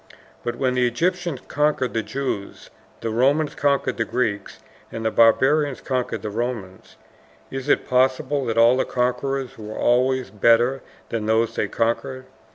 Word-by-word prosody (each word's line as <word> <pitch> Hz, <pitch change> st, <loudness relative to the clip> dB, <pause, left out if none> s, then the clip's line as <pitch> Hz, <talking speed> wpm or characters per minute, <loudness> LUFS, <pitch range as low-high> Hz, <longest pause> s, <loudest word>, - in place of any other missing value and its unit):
But 120 Hz, 0 st, -2 dB
when 130 Hz, +1 st, 0 dB
the 125 Hz, -1 st, +2 dB
Egyptians 170 Hz, +3 st, -1 dB
conquered 150 Hz, -3 st, 0 dB
the 115 Hz, -, 0 dB
Jews, 105 Hz, -2 st, -5 dB, 0.3 s
the 115 Hz, -, -2 dB
Romans 140 Hz, +6 st, +2 dB
conquered 140 Hz, -1 st, 0 dB
the 115 Hz, -, +1 dB
Greeks, 110 Hz, -4 st, -2 dB, 0.3 s
and 115 Hz, 0 st, -5 dB
the 110 Hz, -, +1 dB
Barbarians 135 Hz, +5 st, +3 dB
conquered 130 Hz, -2 st, -3 dB
the 105 Hz, -, -4 dB
Romans, 110 Hz, -5 st, -5 dB, 0.6 s
is 135 Hz, +1 st, -5 dB
it -, -, +2 dB
possible 130 Hz, +2 st, +1 dB
that 115 Hz, 0 st, -2 dB
all 115 Hz, +2 st, +6 dB
the -, -, +2 dB
conquerors 125 Hz, +1 st, -2 dB
were 110 Hz, 0 st, -7 dB
always 130 Hz, +1 st, +1 dB
better 120 Hz, +5 st, +3 dB, 0.3 s
than 110 Hz, -2 st, -3 dB
those 110 Hz, +1 st, +2 dB
they -, -, 0 dB
conquered? 130 Hz, +3 st, -2 dB
125 Hz, 155 wpm, -22 LUFS, 115-135 Hz, 0.6 s, all